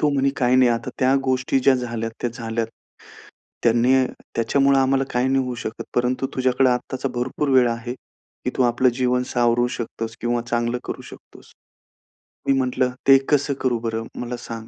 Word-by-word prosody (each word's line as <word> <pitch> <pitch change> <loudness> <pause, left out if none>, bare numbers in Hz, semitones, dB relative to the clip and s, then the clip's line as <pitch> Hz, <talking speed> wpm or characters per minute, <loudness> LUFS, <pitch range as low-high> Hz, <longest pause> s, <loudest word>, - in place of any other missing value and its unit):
तो 150 - +3
म्हणे, 140 -1 +2
"काही 125 0 +3
नाही, 125 -2 +5
आता 115 - -2
त्या 130 +1 +3
गोष्टी 130 +1 +1
ज्या 135 +1 +5
झाल्यात, 115 -2 -3
त्या 120 - -1
झाल्यात. 115 -2 -3 1.0
त्यांनी 120 +2 +3 0.4
त्याच्यामुळं 135 +4 +3
आम्हाला 135 0 +2
काही 125 +2 +1
नाही 135 0 +2
होऊ 125 -1 -4
शकत, 110 0 -6
परंतु 125 +2 0
तुझ्याकडे 130 0 +2
आत्ताचा 130 +2 -2
भरपूर 125 +4 -2
वेळ 130 -2 +5
आहे, 120 +1 -4
की - - -10
तू 130 - +3
आपलं 120 +1 +3
जीवन 125 0 +2
सावरू 120 0 +2
शकतोस" 115 -1 -5
किंवा 120 0 0
"चांगलं 120 +1 0
करू - - -6
शकतोस." - - -16 1.0
मी 135 - +4
म्हटलं, 125 0 +1 0.2
"ते 135 0 +9
कसं 145 -1 +2
करू 125 -3 +1
बरं, 115 0 -3
मला 120 0 -4
सांग." 115 -2 -8
125 Hz, 170 wpm, -22 LUFS, 120-130 Hz, 1.0 s, ते